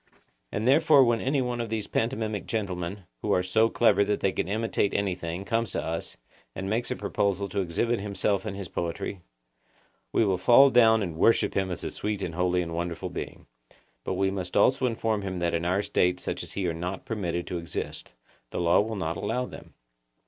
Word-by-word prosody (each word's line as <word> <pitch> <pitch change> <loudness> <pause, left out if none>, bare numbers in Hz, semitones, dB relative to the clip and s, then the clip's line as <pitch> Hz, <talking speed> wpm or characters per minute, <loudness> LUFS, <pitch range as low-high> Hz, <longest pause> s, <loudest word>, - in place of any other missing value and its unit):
And 110 +3 -1
therefore 150 0 +6
when 120 -2 +2
any 135 0 +1
one 120 -1 -2
of 115 - -4
these 110 -2 -2
pantomimic 110 -3 -2
gentlemen, 95 -3 -3 0.2
who - - -1
are 90 - +2
so 110 +5 +3
clever 105 -4 +4
that 105 0 0
they 95 - +1
can 90 - -2
imitate 110 0 0
anything, 90 -2 -2
comes 115 -3 -1
to - - -1
us, 80 0 -4 0.4
and 95 - -4
makes 115 +4 -1
a - - -1
proposal 100 -1 -1
to 100 - -2
exhibit 110 +7 0
himself 100 0 -1
and 110 -3 -4
his 100 -2 -5
poetry, 85 +3 -4 0.9
we 115 - +3
will 95 -3 +1
fall 125 +8 +7
down 110 -3 +5
and 85 -4 -5
worship 115 +7 +3
him 95 -1 0
as 90 - -4
a - - -3
sweet 105 -2 -3
and 85 - -3
holy 90 +1 +1
and 85 -1 -6
wonderful 85 0 -3
being; - - -7 0.6
but 95 - -2
we 95 +1 +1
must 95 -1 -3
also 130 +5 +4
inform 110 -2 -1
him 95 -2 -4
that 85 -1 0
in 85 0 -1
our 95 +3 +1
State 90 0 +1
such - - -3
as - - -8
he 100 - -2
are 85 - 0
not 90 +3 -5
permitted 90 -6 -2
to 90 - -3
exist; 85 -6 -6 0.3
the - - -4
law 85 0 +4
will 110 +1 -3
not 85 -4 -2
allow 125 +5 -1
them. - - -12
100 Hz, 205 wpm, -27 LUFS, 90-115 Hz, 0.9 s, fall